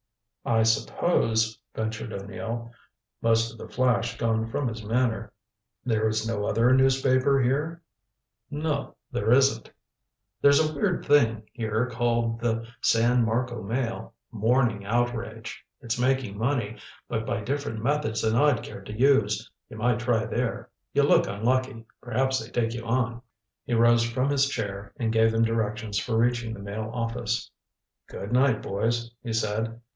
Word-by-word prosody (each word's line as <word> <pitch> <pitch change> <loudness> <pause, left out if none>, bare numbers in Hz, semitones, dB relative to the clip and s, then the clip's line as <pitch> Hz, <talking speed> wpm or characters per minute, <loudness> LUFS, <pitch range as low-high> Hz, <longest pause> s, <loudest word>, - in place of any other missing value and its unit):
"I 115 -1 +2
suppose," 110 -1 +1 0.2
ventured 110 0 -3
O'Neill, 115 +4 -5 0.5
most 115 0 +2
of 115 - -14
the - - -9
flash 120 -2 +1
gone 115 -1 0
from 130 +4 -2
his 110 -1 -5
manner, 110 -2 0 0.5
"there 110 -3 +1
is 110 0 -1
no 105 -3 -1
other 115 +4 +3
newspaper 130 +1 +3
here?" 150 +7 0 0.7
"No, 150 -1 -2 0.2
there 120 -2 0
isn't. 135 -3 +3 0.7
There's 140 0 +6
a 155 0 +1
weird 145 - -1
thing 115 -7 +3
here 110 0 -1
called 115 -1 0
the 115 -1 -1 0.2
San 120 +2 +3
Marco 120 +1 -1
Mail 115 +2 -3 0.2
a - - -12
morning 115 -1 +2
outrage. 115 0 -2 0.2
It's 120 -2 -3
making 130 -4 +1
money, 115 -3 -1 0.3
but 110 -2 -2
by 110 - -2
different 125 -2 -3
methods 145 -4 0
than 110 0 +2
I'd 140 -2 +3
care - - -8
to 105 +3 -8
use. 110 -6 +3 0.2
You 110 - -9
might 120 +1 +1
try 115 -2 +1
there. - - -3 0.2
You - - +4
look - - +4
unlucky. 120 +3 -1 0.2
Perhaps 130 +2 0
they'd 110 +1 -10
take 115 -1 +1
you 120 -1 -5
on." 120 0 -1 0.4
He 120 - 0
rose 120 0 +5
from 130 +4 0
his 140 -1 +3
chair, 100 -5 -4
and 115 -4 -1
gave 115 0 +4
them 115 0 +2
directions 110 -2 -1
for 115 0 -1
reaching 120 -1 +1
the - - -11
Mail 105 +2 -5
office. 115 -1 -2 0.6
"Good 100 - -7
night, 125 -3 +3
boys," 115 +4 -1
he 115 - -5
said. 110 +1 -1
115 Hz, 155 wpm, -26 LUFS, 110-125 Hz, 0.7 s, There's